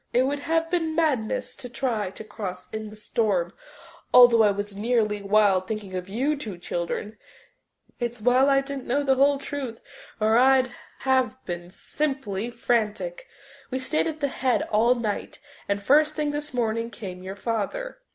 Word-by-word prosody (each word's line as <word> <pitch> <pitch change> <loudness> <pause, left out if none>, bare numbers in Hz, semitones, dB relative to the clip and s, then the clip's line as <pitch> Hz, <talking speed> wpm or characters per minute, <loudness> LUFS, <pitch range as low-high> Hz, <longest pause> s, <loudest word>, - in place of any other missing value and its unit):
"It 250 - +4
would 280 +2 -1
have 325 +2 0
been 325 -3 0
madness 285 -10 0
to 250 - -8
try 235 -5 -1
to 195 - -10
cross 195 -4 -6
in 220 -1 -4
the 210 - -11
storm, 210 -5 0 0.6
although 245 -2 +8
I 210 - +6
was 205 0 -3
nearly 210 -1 +1
wild 200 -2 +3
thinking 210 -3 -5
of 185 0 -4
you 265 +9 0
two 215 -10 -6
children. 175 +5 -4 0.8
It's 240 0 -3
well 250 +5 +4
I 275 0 +4
didn't 275 -1 -6
know 280 +4 +1
the 270 -1 +4
whole 280 +2 +4
truth 275 -4 -5 0.4
or 220 +2 +4
I'd 260 0 +4 0.3
have 260 -1 +2
been 175 0 -5
simply 240 -2 -3
frantic. 215 -7 -1 0.4
We 260 - -2
stayed 305 +5 0
at 315 -1 -5
the 285 - +2
Head 260 -1 +1
all 230 +4 +4
night, 220 -4 -3 0.3
and 200 0 +1
first 300 +6 +4
thing 300 -1 0
this 295 +1 -4
morning 230 -2 -1
came 185 -6 -8
your 190 +1 -6
father." 235 - -3
235 Hz, 170 wpm, -25 LUFS, 210-275 Hz, 0.8 s, although